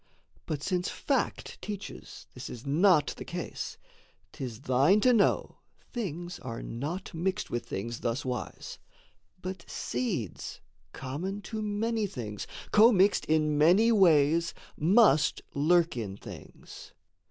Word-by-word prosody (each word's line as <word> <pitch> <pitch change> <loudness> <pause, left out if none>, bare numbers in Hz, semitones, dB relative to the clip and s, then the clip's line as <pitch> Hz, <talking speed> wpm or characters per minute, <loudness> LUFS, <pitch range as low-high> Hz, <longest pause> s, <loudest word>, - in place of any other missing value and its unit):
But 145 -2 -3
since 180 -1 0
fact - - -2
teaches 205 -1 -7
this - - -7
is 120 +2 -9
not 155 +2 +4
the - - -6
case, - - -5 0.5
'Tis 125 -3 -6
thine 135 +11 +4
to 250 +2 +5
know 210 -4 +2 0.3
things 175 - -4
are 115 -2 -6
not 155 +13 -5
mixed 185 +3 -2
with 120 - -3
things 115 +4 -4
Thuswise; 125 +1 -4 0.6
but 185 -1 -6
seeds, 170 - -3 0.3
common 180 +10 -5
to 220 -1 -5
many 215 +1 -1
things, 105 - -6 0.2
Commixed 210 -3 +5
in 155 -1 +2
many 185 +9 +6
ways, 170 -5 +4 0.2
must 160 - +4
lurk 165 +3 +3
in 100 -5 -4
things. - - -11
170 Hz, 120 wpm, -29 LUFS, 135-200 Hz, 0.6 s, many